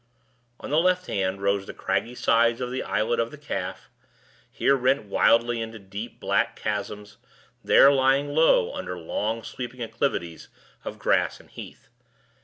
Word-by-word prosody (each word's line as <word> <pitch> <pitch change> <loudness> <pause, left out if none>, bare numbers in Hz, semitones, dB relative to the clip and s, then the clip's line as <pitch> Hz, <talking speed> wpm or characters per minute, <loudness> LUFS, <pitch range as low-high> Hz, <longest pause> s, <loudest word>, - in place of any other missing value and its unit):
On - - -7
the 150 - +4
left 185 +1 +2
hand 95 - -2
rose 100 0 0
the - - -8
craggy 100 +6 -2
sides 115 0 +2
of 125 -1 -3
the 130 - -2
Islet 120 +2 0
of 115 0 0
the 150 - -11
Calf, 95 -11 -5 0.6
here 140 - +2
rent 130 +1 +1
wildly 115 +3 +2
into 115 0 -6
deep 100 +3 -8
black - - 0
chasms, 105 0 -5 0.5
there 140 - +7
lying 135 +1 +2
low 160 - +4
under 90 - -5
long 110 +7 -3
sweeping 125 0 -7
acclivities 115 -8 -3 0.4
of - - -6
grass - - +1
and - - -20
heath. - - -11
115 Hz, 155 wpm, -25 LUFS, 100-130 Hz, 0.6 s, there